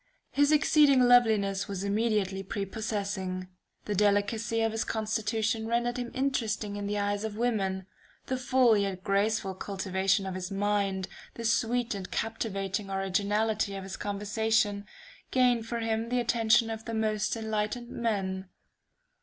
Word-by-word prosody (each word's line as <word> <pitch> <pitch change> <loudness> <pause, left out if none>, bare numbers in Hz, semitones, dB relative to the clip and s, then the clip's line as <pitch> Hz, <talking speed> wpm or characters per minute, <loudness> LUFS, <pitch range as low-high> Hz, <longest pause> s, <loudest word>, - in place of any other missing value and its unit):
His 285 +3 +3
exceeding 295 -3 +5
loveliness 210 -5 +4
was 195 -1 -4
immediately 200 -2 0
prepossessing, 195 -2 -3 0.4
the 210 - -2
delicacy 210 +3 +1
of 225 - +1
his 225 0 -1
constitution 220 +1 -1
rendered 240 +2 0
him 245 -1 -3
interesting 230 -6 -1
in 205 0 -4
the 205 0 -1
eyes 205 0 -1
of 215 -1 -4
women, 195 -6 0 0.4
the 260 - -1
full 255 -2 +4
yet 195 -2 -1
graceful 200 -1 +1
cultivation 195 0 0
of 190 - -3
his 185 0 -4
mind, 195 -1 0 0.3
the 230 - -6
sweet 230 +1 +1
and 195 -2 -6
captivating 200 -3 -2
originality 200 +2 0
of 195 - -5
his 190 0 -6
conversation, 205 0 0 0.4
gained 245 -3 +2
for 235 - -2
him 225 0 -1
the 250 0 +1
attention 225 -1 +3
of 225 0 -6
the 230 - -4
most 215 -1 0
enlightened 220 +2 -3
men. 190 -5 -2
215 Hz, 140 wpm, -29 LUFS, 195-230 Hz, 0.4 s, exceeding